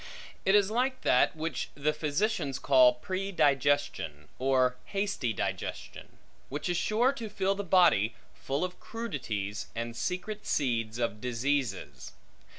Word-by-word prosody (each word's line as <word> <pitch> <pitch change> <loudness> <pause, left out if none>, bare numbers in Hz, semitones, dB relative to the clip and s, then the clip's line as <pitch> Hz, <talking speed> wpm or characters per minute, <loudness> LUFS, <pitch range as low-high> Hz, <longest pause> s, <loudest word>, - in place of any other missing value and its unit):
It 195 - +5
is 205 0 +4
like 255 +3 0
that, 125 - +3
which 160 +1 -3
the 150 +2 0
physicians 150 - -1
call 130 -3 +5
predigestion, 145 - 0
or 130 -1 +3
hasty 195 - -1
digestion; - - -5 0.3
which 145 +6 -3
is 175 - +1
sure 225 +9 +2
to 230 -6 -6
fill 195 -1 0
the 200 +1 -4
body 165 - +4 0.2
full 140 +5 -3
of 180 0 -4
crudities, 115 - -4
and 115 0 -4
secret 195 - -4
seeds 115 -5 0
of 115 -3 -2
diseases. 120 - -2
145 Hz, 130 wpm, -30 LUFS, 125-195 Hz, 0.3 s, It